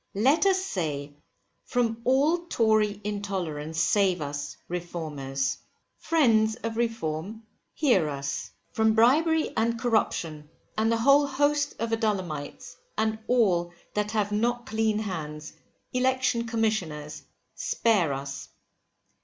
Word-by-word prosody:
LET 270 - +3
US 380 -1 +4
SAY, 145 - -3 0.5
From 235 -2 0
all 300 +7 +2
Tory 215 - +2
intolerance 180 -7 -3
save 190 -2 +3
us, 145 -1 -5
Reformers. 155 -6 -3 0.4
Friends 225 -9 +3
of 225 0 -2
Reform, 220 -3 -2 0.3
hear 200 - +3
us. 140 -1 -4 0.2
From 220 +1 +3
bribery 310 +8 +4
and 230 +1 +1
corruption, 165 -10 -1 0.3
and 220 +1 +2
the 230 - +2
whole 280 +5 +5
host 290 +1 +1
of 230 0 -3
Adullamites, 205 -1 -2 0.2
and 220 0 0
all 180 -8 +2 0.2
that 210 0 -1
have 210 -1 0
not 240 +3 0
clean 220 -1 0
hands, 155 -7 -5 0.4
Election 255 -2 +1
Commissioners, 195 -10 -2 0.3
spare 205 -10 +1
us. 140 0 -5
215 Hz, 110 wpm, -27 LUFS, 160-235 Hz, 0.5 s, whole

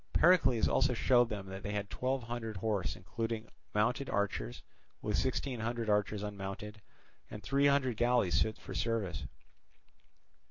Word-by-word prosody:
Pericles 155 -10 +5
also 130 -2 +2
showed 120 0 +4
them 105 -3 -4
that 95 +1 -6
they 105 - -4
had 100 -1 -3
twelve 130 0 -1
hundred 115 -2 -4
horse 95 -2 -1
including 115 +4 -4 0.3
mounted 125 +6 +1
archers, 95 -13 -2 0.4
with 105 -1 -1
sixteen 130 -1 -1
hundred 115 -1 -1
archers 105 0 +1
unmounted, 105 +1 -6 0.5
and 105 - -8
three 140 +8 +3
hundred 135 -5 +2
galleys 120 -6 +3
fit 110 -1 0
for - - -9
service. 105 -9 -1
110 Hz, 145 wpm, -33 LUFS, 100-125 Hz, 0.5 s, Pericles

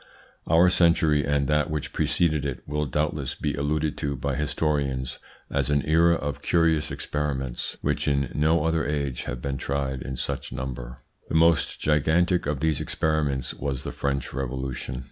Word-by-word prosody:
Our 85 +3 +5
century 85 -4 +4
and 70 0 +1
that 75 +2 +2
which 75 -2 -3
preceded 75 0 +1
it 70 -3 -5
will 75 0 -1
doubtless 75 0 -1
be 75 - -2
alluded 75 +1 -1
to 70 -1 -1
by 70 +2 -2
historians 70 -3 -1 0.3
as 70 -1 0
an 70 -1 +1
era 85 +2 +4
of 75 -3 -4
curious 80 -2 +2
experiments, 70 -4 -3
which - - 0
in 70 -2 +1
no 80 +1 +2
other 80 0 +1
age 70 -3 -2
have 60 -1 -5
been 70 -1 -2
tried 65 -1 -2
in 65 - -5
such - - -4
number. 60 -1 -6 0.3
The - - -2
most 85 0 +3
gigantic 80 +3 +2
of 70 -2 -2
these 80 -3 +1
experiments 75 -5 0
was 70 -3 -3
the - - -4
French 70 -1 -2
Revolution. 65 -1 -4
75 Hz, 165 wpm, -26 LUFS, 70-80 Hz, 0.3 s, Our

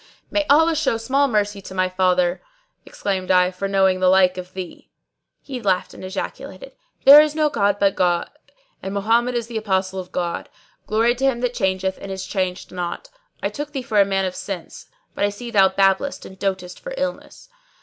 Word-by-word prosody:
'" - - -39
"May 305 -1 0
Allah 320 +3 +5
show 305 -7 +1
small 270 +5 +1
mercy 205 -4 -1
to 190 - -10
my 185 0 +2
father," 185 -1 +1 0.5
exclaimed 190 -2 -3
I, 180 -1 +4
"for 185 +2 -4
knowing 190 -1 +2
the 185 - +2
like 185 -1 +4
of 185 0 -9
thee." 185 -2 -8 0.5
He 260 -3 -6
laughed 190 -4 0
and - - -11
ejaculated, 190 - -6 0.3
"There 285 +2 +11
is 305 0 0
no 305 -1 +2
god 205 -4 +1
but 200 -1 +3
the - - -20
God 175 -2 +1 0.5
and 195 +1 -5
Mohammed 230 +5 +1
is 235 -1 -1
the 230 -1 -5
Apostle 190 -2 -1
of 180 -1 -8
God! 175 -1 -3 0.4
Glory 225 +3 +2
to 260 +2 -2
Him 250 -3 +1
that 250 -1 -1
changeth 190 -3 -1
and 195 - -7
is 190 0 -5
changed 185 -2 -3
not! 180 - -5 0.3
I - - +1
took 295 0 -6
thee 270 -3 -3
for 215 -4 +3
a - - +7
man 195 -1 0
of 185 - -3
sense, 185 -4 -7 0.3
but - - -3
I 205 - +3
see 235 +4 -8
thou 195 -3 +5
babblest 195 +8 +1
and 190 0 -12
dotest 190 -2 -3
for - - -7
illness. - - -5
195 Hz, 205 wpm, -21 LUFS, 185-240 Hz, 0.5 s, There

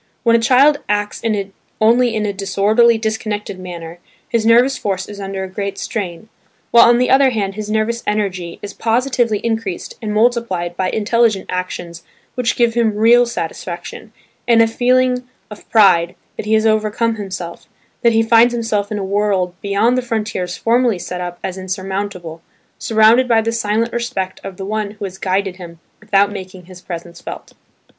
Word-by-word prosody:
When 230 -1 +4
a - - +4
child 270 +5 +4
acts 205 0 -1 0.6
only 235 +2 +3
in 215 -1 -1
a 205 - -2
disorderly, 210 +4 +3
disconnected 215 -3 -3
manner, 170 -2 -8 0.3
his 225 -1 0
nervous 245 +4 +5
force 190 -2 -3
is 205 -1 -9
under 195 -1 -4
a - - -4
great 200 +1 -5
strain; 195 -2 -5 0.4
while 235 0 +7
on 240 - +5
the 250 +1 +1
other 270 0 +5
hand 205 -5 -2
his 210 +1 -6
nervous 220 +2 0
energy 185 -5 -2
is 205 - -6
positively 235 -1 +1
increased 225 -5 -3
and 215 -2 -3
multiplied 210 -6 0
by 185 +1 -1
intelligent 220 -1 +1
actions 175 -2 -5 0.3
which 250 -2 0
give 235 -1 +2
him 225 -3 +1
real 235 +3 +5
satisfaction, 175 0 -6 0.4
and 235 -1 +5
a - - +4
feeling 250 +2 +1 0.3
of 210 - -12
pride 185 -6 +4 0.2
that - - -6
he 220 - +3
has 220 0 +2
overcome 220 +1 +1
himself, 185 -4 -7 0.3
that 235 - +4
he 225 0 +3
finds 230 +1 +4
himself 215 -3 -1
in 210 - -2
a 200 - -3
world 195 -2 0
beyond 205 +5 +1
the 255 - +1
frontiers 210 -6 -3
formerly 235 -2 +2
set 180 0 -6
up 175 -1 -5
as 190 0 -4
insurmountable, 190 -3 -5 0.4
surrounded 225 +3 +4
by 230 -2 +4
the 225 +1 -1
silent 230 0 -1
respect 235 -6 -3
of 190 -2 -8
the 190 - -6
one 215 0 -2
who 205 - -5
has 190 0 -8
guided 190 0 -1
him 170 -3 -11 0.2
without 205 -1 +2
making 185 -2 -9
his 180 0 -13
presence 170 -1 -8
felt. - - -9
210 Hz, 175 wpm, -18 LUFS, 190-230 Hz, 0.6 s, while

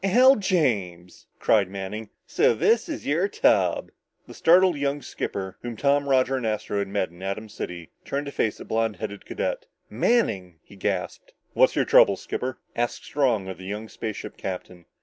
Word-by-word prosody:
"Al 250 +8 +6
James!" 105 - -1
cried 100 -4 +3
Manning. 100 +3 -6 0.2
"So - - +3
this 225 - +2
is 310 - -5
your 165 +7 +2
tub?" - - +2 0.3
The - - -12
startled 180 +1 +5
young 140 0 -2
skipper, 95 -1 -5
whom 120 -2 -6
Tom, 140 +1 +2
Roger 130 0 +3
and 130 - -4
Astro 105 -2 -1
had 100 - -1
met 95 -3 -1
in 85 +1 -15
Atom 100 +3 -4
City, 90 -5 -7
turned 140 +1 -3
to 140 - -5
face 110 - -1
the - - -9
blond 115 -1 0
headed 105 -2 -7
cadet. - - -3 0.2
"Manning!" 95 - +1
he - - -16
gasped. 95 - -3 0.2
"What's - - +4
your - - +2
trouble, - - +6
skipper?" 130 0 -4 0.2
asked 120 0 -2
Strong 120 -9 +1
of 95 -2 -7
the 95 - -9
young 105 +3 -5
spaceship 110 -1 -6
captain. 90 -2 -6
110 Hz, 175 wpm, -25 LUFS, 95-145 Hz, 0.3 s, Al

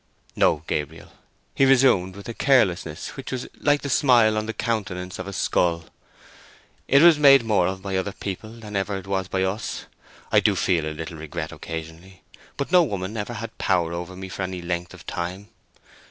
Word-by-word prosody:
"No, 75 - +2
Gabriel," 75 +2 -4 0.4
he - - +2
resumed, 125 -9 +4
with 100 - -10
a 115 - -4
carelessness 95 - +1
which 135 - -8
was 130 -1 -4
like 145 -1 +2
the - - -3
smile 120 -6 +4
on 110 0 -2
the - - -1
countenance 95 -6 -3
of 95 - -5
a - - -5
skull: 85 -2 0 1.0
"it 140 +3 +5
was 170 -3 +7
made 135 -3 +7
more 105 -6 +2
of 95 0 -4
by 100 -1 -3
other 95 +2 -1
people 100 +1 -6
than 110 -3 -9
ever 100 0 -1
it 95 - -8
was 95 -1 -2
by 95 0 -1
us. 95 +4 -3 0.5
I - - +6
do - - +2
feel 85 -4 +1
a 80 0 -5
little 80 +1 -6
regret 80 +1 -5
occasionally, 80 +3 -8 0.3
but 140 - -3
no 180 -1 +7
woman 100 - -3
ever 110 +2 -4
had 115 0 -7
power 85 -2 +1
over 85 +2 -6
me 95 +1 -7
for 95 - -7
any 95 -1 -4
length 85 0 -3
of - - -15
time. 90 +4 -5
95 Hz, 195 wpm, -24 LUFS, 90-115 Hz, 1.0 s, was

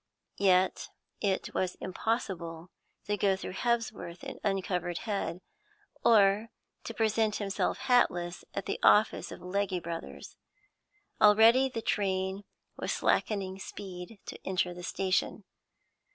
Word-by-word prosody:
Yet 185 -1 +3 0.3
it 195 -3 -1
was 185 -1 -1
impossible 180 -5 -3 0.3
to 205 0 -1
go 195 -1 +3
through 190 - -6
Hebsworth 225 -6 -2
with - - -7
uncovered 180 -3 -1
head, 195 -5 -3 0.6
or 210 0 +5 0.4
to - - -5
present 220 -1 +1
himself 200 -2 -1
hatless 175 -8 +2
at 200 - -3
the - - -3
office 210 +1 +4
of - - -9
Legge 185 -1 -1
Brothers. 165 0 -7 0.8
Already 225 +5 +7
the 230 -3 -5
train 190 -1 -1 0.3
was - - -2
slackening 195 -3 0
speed 190 +1 -8
to - - -8
enter 180 -1 0
the 180 - -9
station. 185 +2 -1
195 Hz, 120 wpm, -30 LUFS, 180-210 Hz, 0.8 s, Already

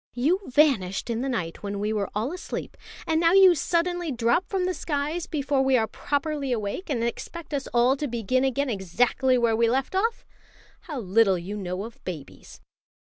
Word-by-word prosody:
"You 300 +10 +2
vanished 245 -8 +2
in 230 +1 -1
the 270 - -2
night 180 -10 -3
when 200 0 -4
we 210 +2 -1
were 205 -2 -1
all 230 +9 -1
asleep, 360 - -6 0.3
and 320 -2 +1
now 335 +1 +4
you 380 -2 +8
suddenly 345 0 0
drop 240 +8 +1
from 380 -2 0
the 370 - 0
skies 305 +2 -2
before 285 -3 0
we 265 -1 +3
are 225 - +2
properly 285 +2 -2
awake, 225 - -3
and 240 -5 0
expect 310 +7 -5
us 275 -1 -2
all 245 +2 +4
to 295 - -2
begin 240 +1 0
again 270 0 0
exactly 240 +6 +1
where 235 -2 +2
we 230 0 +3
left 265 +7 0
off. 450 +5 0 0.6
How 300 -6 -4
little 195 -1 +3
you 180 +4 -6
know 185 -1 -4
of 230 +1 -11
babies!" 160 -7 -9
255 Hz, 190 wpm, -25 LUFS, 220-310 Hz, 0.6 s, you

